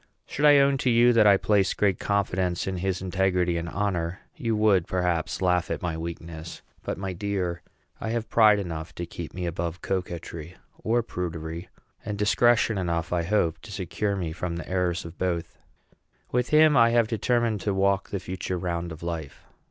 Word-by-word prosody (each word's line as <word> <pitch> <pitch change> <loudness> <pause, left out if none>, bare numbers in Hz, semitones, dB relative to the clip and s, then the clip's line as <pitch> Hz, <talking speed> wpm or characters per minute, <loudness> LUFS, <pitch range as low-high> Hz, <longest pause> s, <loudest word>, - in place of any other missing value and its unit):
Should 145 - -1
I 145 -1 +8
own 140 -1 +4
to 130 - +1
you 120 +1 +5
that 110 -2 +5
I 100 -1 +7
place 100 -1 +2
great 100 -3 +1
confidence 95 -3 0
in 95 -1 -2
his 95 0 -2
integrity 90 -1 +1
and 85 0 -3
honor, 95 -3 -2
you 115 -9 -1
would, 105 -5 +3
perhaps, 90 -1 -1
laugh 90 -1 +2
at - - -3
my 85 -2 -1
weakness; 85 0 -7 0.2
but, - - -4
my 95 -1 -4
dear, 90 -2 -2 0.4
I 110 - -4
have 115 0 -2
pride 110 -2 +5
enough 80 -5 -5
to 85 - -4
keep 85 -1 -7
me 90 -1 -4
above 85 0 -4
coquetry 85 -3 -4 0.3
or 120 +1 +2
prudery, 85 -3 -5 0.3
and 105 - -4
discretion 110 0 +3
enough, 85 -1 -1
I 85 - +2
hope, 85 -2 +1
to 110 - -11
secure 95 +2 -2
me 85 -4 -3
from 85 +1 -4
the 85 - -6
errors 90 -2 -1
of 85 +1 -10
both. 85 -3 -2 0.7
With 125 0 0
him 155 -1 +6
I 115 -2 +6
am 115 -1 +4
determined 115 -1 0
to 100 - 0
walk 95 0 +1
the 100 - -3
future 90 0 -4
round 85 -1 -3
of 80 +1 -9
life. 80 -4 -5
95 Hz, 185 wpm, -26 LUFS, 85-105 Hz, 0.7 s, I